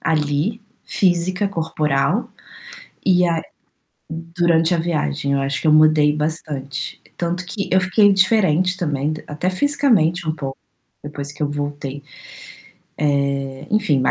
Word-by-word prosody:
ali 155 +7 0 0.2
física, 185 +1 +1
corporal 160 - 0 0.8
e 180 -2 +4
a 165 -1 0 0.7
durante 165 0 +1
a - - 0
viagem, 145 - -1
eu 140 - +1
acho 135 +1 -2
que - - 0
eu 150 - +6
mudei 155 -1 +5
bastante, 145 -4 -4 0.2
tanto 175 +1 -2
que 200 +2 -4
eu 190 - +5
fiquei 205 +2 +4
diferente 185 -3 +3
também, 150 -3 -1
até 155 +5 -2
fisicamente 190 - +2
um 155 - 0
pouco 135 -3 -6 0.4
depois 145 -1 -6
que 150 - -18
eu 145 - +1
voltei, 145 -1 -4 1.4
eh, 135 0 -9
enfim, 210 -8 +2
160 Hz, 130 wpm, -20 LUFS, 145-185 Hz, 1.4 s, eu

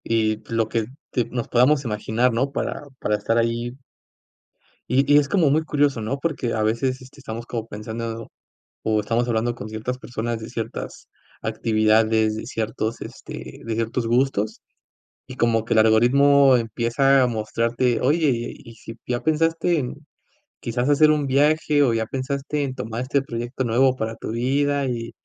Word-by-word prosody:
Y 110 -1 0
lo 115 -1 +1
que 110 -1 -1 0.3
te 120 - 0
nos 120 0 -4
podamos 135 +4 +3
imaginar, 115 +3 0
¿no? 135 +4 0
Para - - -3 0.2
para 105 - 0
estar 110 +3 0
ahí 115 +1 0 1.2
y 135 +3 +2
y - - +8
es 145 -1 +2
como 175 -7 +3
muy 155 +3 +2
curioso, 145 -5 +1
¿no? 110 +6 -2
Porque 140 -6 -2
a 110 - 0
veces, 130 +4 0
este, 130 +2 -15
estamos 115 -3 -6
como 115 -2 -5
pensando, 115 +2 -6 0.5
o 110 -1 +1
estamos 115 +3 0
hablando 120 +1 0
con 110 -2 -8
ciertas 110 +4 -4
personas 120 -2 -4
de 110 0 -8
ciertas 115 -1 -6 0.3
actividades, 110 0 +2
de 110 - -6
ciertos, 110 -1 -3
este, - - -9
de 115 0 -2
ciertos 115 +1 -1
gustos, 120 -3 0 0.7
y 130 - -9
como 115 -2 +2
que 115 - 0
el 110 - +6
algoritmo 135 +5 +5
empieza 120 +4 +2
a - - +4
mostrarte: 115 +2 0
"Oye, 150 +3 +3 0.2
¿y 115 - -14
si 115 - -10
ya 120 -1 -2
pensaste 165 +2 +1
en 125 -4 -3 0.7
quizás 120 +3 -1
hacer 155 +1 +5
un 150 -2 +1
viaje, 150 +2 +3
o 125 -4 +2
ya 115 0 0
pensaste 140 +4 -3
en 130 -2 -4
tomar 115 -2 -4
este 135 +2 0
proyecto 120 0 -4
nuevo 130 +2 +3
para 110 -2 -3
tu 110 - -6
vida", 140 +4 +1
y 115 -2 -3
120 Hz, 170 wpm, -23 LUFS, 115-135 Hz, 1.2 s, y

